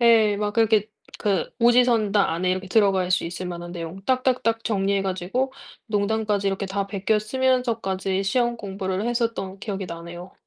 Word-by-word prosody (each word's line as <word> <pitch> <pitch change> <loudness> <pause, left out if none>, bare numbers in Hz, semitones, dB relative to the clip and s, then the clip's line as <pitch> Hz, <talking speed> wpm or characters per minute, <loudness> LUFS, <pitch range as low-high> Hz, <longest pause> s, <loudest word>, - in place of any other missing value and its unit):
예 225 -3 +5
막 210 0 -1
그렇게 220 -2 +3 0.3
그 200 -5 0
오지선다 235 -5 +4
안에 180 +2 0
이렇게 185 +1 -2
들어갈 190 -3 +3
수 180 - +2
있을 175 +2 -5
만한 175 0 -6
내용 170 +2 -7
딱딱딱 255 -3 +1
정리해 195 -2 +1
가지고 195 +8 -2 0.3
농담까지 210 -1 0
이렇게 195 +1 -2
다 195 +1 -2
베껴 200 +2 0
쓰면서까지 220 -6 0
시험 240 +4 +1
공부를 195 -1 -3
했었던 230 -5 -2
기억이 195 -2 -4
나네요. 170 +2 -8
200 Hz, 360 characters per minute, -24 LUFS, 190-230 Hz, 0.3 s, 예